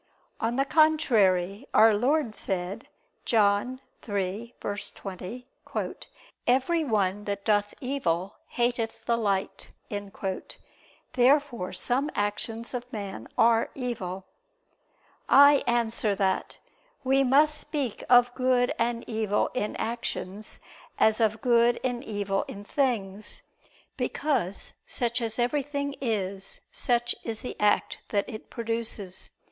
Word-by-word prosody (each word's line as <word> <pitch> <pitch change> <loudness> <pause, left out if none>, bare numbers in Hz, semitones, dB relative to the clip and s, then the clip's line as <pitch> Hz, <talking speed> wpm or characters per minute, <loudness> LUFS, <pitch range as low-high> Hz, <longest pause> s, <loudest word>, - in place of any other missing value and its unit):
On 230 +2 0
the 270 +1 +2
contrary, 230 - +3
Our 220 +1 +7
Lord 250 +3 +1
said 190 +2 -3 0.4
(John 220 +4 +2 0.2
3:20): 205 +1 -4 1.0
"Every 270 +7 +3
one 205 -5 0
that 200 -1 -3
doth 205 -1 +2
evil, 195 -9 -1
hateth 235 -2 -1
the 235 - +2
light." 200 -4 -1 1.4
Therefore 255 -5 +3
some 250 +10 0
actions 220 +3 -2
of 250 0 -5
man 195 - -6
are 230 0 +4
evil. 195 -8 -4 1.0
I 285 0 +7
answer 230 -3 +1
that, 190 -1 0 0.5
We 270 +1 +3
must 295 +3 +4
speak 290 -8 -3
of 245 0 +6
good 255 -1 +2
and 235 0 -1
evil 220 -2 0
in 210 -4 -2
actions 215 -3 -4 0.4
as 220 +1 +4
of 220 -1 +1
good 235 -1 +4
and 245 -1 -1
evil 205 -4 -1
in 200 - -8
things: 215 -5 -2 0.5
because 235 - -1
such 240 0 0
as 225 -1 -1
everything 280 +3 -1
is, 200 -5 -2
such 240 -1 +1
is 225 -2 -2
the 250 - -5
act 210 0 +2
that 200 -2 0
it 215 -4 -8
produces. 225 -5 -2
230 Hz, 110 wpm, -27 LUFS, 205-250 Hz, 1.4 s, Our